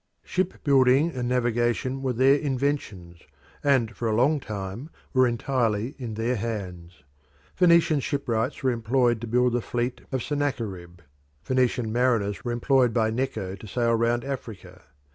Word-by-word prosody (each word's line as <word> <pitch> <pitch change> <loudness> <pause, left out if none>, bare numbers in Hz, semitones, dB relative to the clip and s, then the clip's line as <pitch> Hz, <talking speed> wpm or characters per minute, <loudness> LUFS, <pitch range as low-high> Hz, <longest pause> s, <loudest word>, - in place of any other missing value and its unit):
Shipbuilding 140 -4 +2
and 125 -3 -3
navigation 120 +1 0
were 130 -2 -1
their 130 +3 +5
inventions, 135 - -2 0.4
and 130 -6 +2
for 115 - -3
a 110 - +1
long 140 +6 +3
time 105 +4 -6 0.2
were 130 -1 +4
entirely 120 -1 -1
in 115 -4 -5
their 115 +3 0
hands. 90 -7 -6 0.5
Phoenician 170 -4 +4
shipwrights 130 -3 -2
were 130 - +3
employed 120 0 +1
to 120 - -5
build 125 +1 +2
the 120 - +1
fleet 120 +2 -3
of 130 -3 -2
Sennacherib: 105 - -3 0.4
Phoenician 125 -3 0
mariners 115 -5 +1
were 120 - -2
employed 125 0 +2
by 110 -2 +2
Necho 115 -6 -3
to 100 +2 -10
sail 115 +2 +1
round 115 +1 +1
Africa. 125 -7 -7
120 Hz, 145 wpm, -25 LUFS, 110-135 Hz, 0.5 s, their